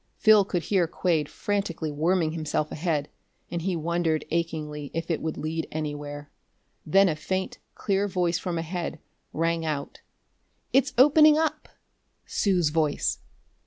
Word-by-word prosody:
Phil 215 -2 +6
could 180 -3 -2
hear 185 -4 +2
Quade 160 -3 0
frantically 190 -6 -2
worming 160 +2 +1
himself 155 -1 -2
ahead, 155 -3 -1 0.4
and 170 -1 -2
he 185 +1 -1
wondered 165 -1 0
achingly 155 -3 -2
if 165 +1 -2
it 160 - -1
would 160 -1 -3
lead 160 +1 -3
anywhere. 145 -1 -5 0.5
Then 195 +5 +4
a 160 - 0
faint, 185 +4 -3 0.2
clear 200 0 0
voice 180 -3 0
from 175 -3 -3
ahead 165 0 -3 0.3
rang 165 +1 0
out: 150 -3 -4 0.7
"It's 275 +2 +3
opening 300 +3 +7
up!" 315 -1 -1 0.6
Sue's 180 -6 +1
voice! 155 -1 0
165 Hz, 135 wpm, -26 LUFS, 155-190 Hz, 0.7 s, opening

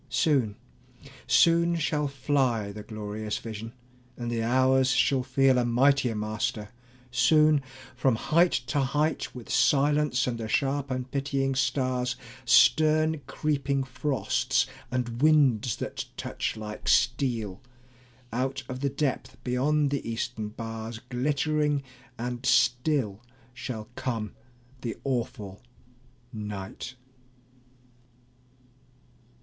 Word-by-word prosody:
Soon, 130 -5 +2 0.7
soon 170 0 +4
shall 150 -2 0
fly 130 -6 0
The 105 +1 -8
glorious 105 0 -5
vision, 115 0 -7 0.5
and 120 -1 -4
the 115 -1 -1
hours 130 +2 +3
shall 135 0 +3
feel 135 0 +3
A - - +2
mightier 125 0 +3
master; 105 0 -2 0.4
soon 150 +4 +4 0.3
from 130 -1 +2
height 170 +9 +3
to 125 +4 -1
height, 145 +3 0
With 125 -3 -8
silence 140 0 +3
and 120 -2 -2
the 110 - -4
sharp 140 +4 0
unpitying 135 +1 -1
stars, 130 -2 0 0.3
Stern 155 +4 +5
creeping 140 -2 -1
frosts, 130 -1 0 0.2
and 125 -1 -3
winds 135 -7 +4
that - - -5
touch - - -3
like 105 0 -7
steel, 120 -6 +1 0.7
Out 130 +2 -2
of 130 0 -5
the 140 +1 0
depth 140 0 -2
beyond 140 +3 +1
the 140 -4 -2
eastern 115 -1 -3
bars, 115 0 -6
Glittering 145 +2 0 0.3
and 120 +1 -4
still 125 -6 +2 0.3
shall 120 -4 -6
come 115 -5 -3 0.5
the 115 -2 -4
awful 110 -7 -3 0.7
night. 105 +3 -6
130 Hz, 105 wpm, -27 LUFS, 115-140 Hz, 0.7 s, Stern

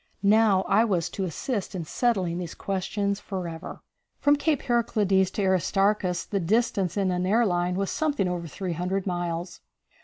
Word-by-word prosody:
Now 205 -2 +4
I 205 +4 +3
was 185 -7 0
to 195 - -2
assist 195 - -3
in 170 -3 -4
settling 185 -4 0
these 175 -2 -6
questions 200 +1 -2
forever. 175 -4 -6 0.4
From 290 0 +4
Cape 295 0 0
Heraclides 215 -6 +2
to 205 - -1
Aristarchus 190 0 +1
the 200 - -2
distance 195 -1 +1
in 195 -2 +1
an 180 0 -1
air 230 +4 +3
line 175 -2 0
was 195 +1 -1
something 290 -11 0
over 175 -2 -3
300 180 +3 -3
miles. 175 -1 -3
190 Hz, 155 wpm, -26 LUFS, 180-210 Hz, 0.4 s, Now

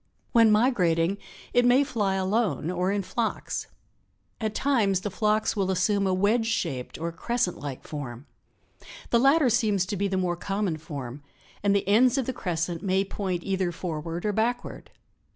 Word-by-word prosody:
When 230 -3 +6
migrating 195 -6 +2 0.3
it 245 - +4
may 245 +3 +5
fly 210 -8 -1
alone 190 -3 0
or 180 +1 0
in 200 -1 -1
flocks. 225 +4 -3 0.7
At 215 -2 -2
times 215 -9 +2
the 205 - -4
flocks 215 +3 +1
will 195 -2 0
assume 195 +2 +1
a 190 - +1
wedge 220 +4 +2
shaped 155 - -2
or 165 +2 -3
a - - -10
crescent 235 +2 -1
like 140 -3 -6
form. 135 -4 -6 0.9
The 235 - +5
latter 275 +1 +4
seems 210 -5 +2
to 195 - -3
be 200 +1 0
the 190 -1 -1
more 180 -2 0
common 195 -1 -2
form, 140 -4 -7 0.4
and 200 0 +2
the 200 - 0
ends 245 +6 +4
of 265 - 0
the 260 - -2
crescent 170 -5 -2
may 190 0 +1
point 185 -3 -3
either 190 -2 -1
forward 165 0 -5
or 210 - +1
backward. 230 +4 -2
195 Hz, 170 wpm, -26 LUFS, 175-225 Hz, 0.9 s, When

